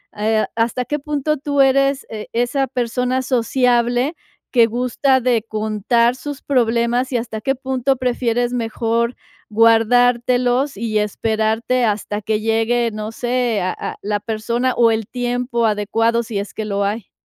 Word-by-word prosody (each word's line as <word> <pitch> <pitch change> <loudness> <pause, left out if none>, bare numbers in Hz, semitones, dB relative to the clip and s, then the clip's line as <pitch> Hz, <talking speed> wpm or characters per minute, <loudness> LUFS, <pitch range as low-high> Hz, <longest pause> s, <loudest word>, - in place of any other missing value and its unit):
eh, 215 +1 +1
a - - -17
¿hasta 230 +2 0
qué 295 +5 -2
punto 300 +1 -1
tú 285 0 -2
eres, 275 +1 +3
eh, 215 -1 -7
esa 245 +3 0
persona 250 +1 -1
sociable 245 +1 +1 0.4
que 235 -3 +5
gusta 250 +3 +1
de 240 -3 +1
contar 220 +3 +1
sus 290 0 -7
problemas 240 -1 +1
y - - +2
hasta 230 -2 -4
qué 270 +4 0
punto 265 0 0
prefieres 245 -1 0
mejor 235 0 -1 0.3
guardártelos 245 +4 +3
y 215 0 -1
esperarte 220 +3 0
hasta 210 -1 -2
que 215 +1 -1
llegue, 225 +2 +1
no 215 0 -5
sé, 240 -3 0
a 185 - 0
a - - -5
la 205 0 -1
persona 235 +4 -1
o 230 -1 +4
el 220 -2 -2
tiempo 245 -1 -1
adecuado, 225 +2 +1
si 220 -2 -5
es 200 +1 -4
que 220 - -4
lo 200 -1 -1
hay? 205 0 -3
235 Hz, 155 wpm, -19 LUFS, 220-250 Hz, 0.4 s, que